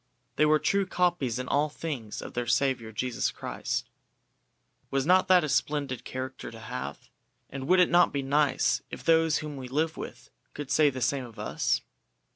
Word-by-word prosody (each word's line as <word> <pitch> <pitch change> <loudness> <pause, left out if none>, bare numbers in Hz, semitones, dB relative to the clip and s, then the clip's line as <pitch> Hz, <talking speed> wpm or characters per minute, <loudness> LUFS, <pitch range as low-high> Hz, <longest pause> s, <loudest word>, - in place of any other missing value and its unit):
They 150 - +4
were 155 0 +5
true 195 +4 +1
copies 175 -10 +1
in 125 0 -4
all 150 +2 +2
things 140 -9 -5
of - - -8
their 120 0 -2
Saviour 125 -5 +1
Jesus 125 +3 -1
Christ." - - -4 1.0
Was 135 0 0
not 185 +3 +4
that 180 -2 +6
a - - -1
splendid 140 -3 -1
character 130 0 -6
to 115 - -11
have, 70 - -7 0.4
and 135 0 -5
would 185 +2 +5
it 180 - +4
not 175 0 +5
be 140 -1 -2
nice 145 +1 +2
if - - -8
those 165 -1 +4
whom 150 -2 -6
we 130 -1 -6
live 155 +5 -1
with - - -8 0.2
could 145 -2 -6
say 155 -2 +5
the 130 -2 -6
same 130 +1 0
of 115 -2 -13
us? 105 - 0
140 Hz, 185 wpm, -28 LUFS, 125-155 Hz, 1.0 s, that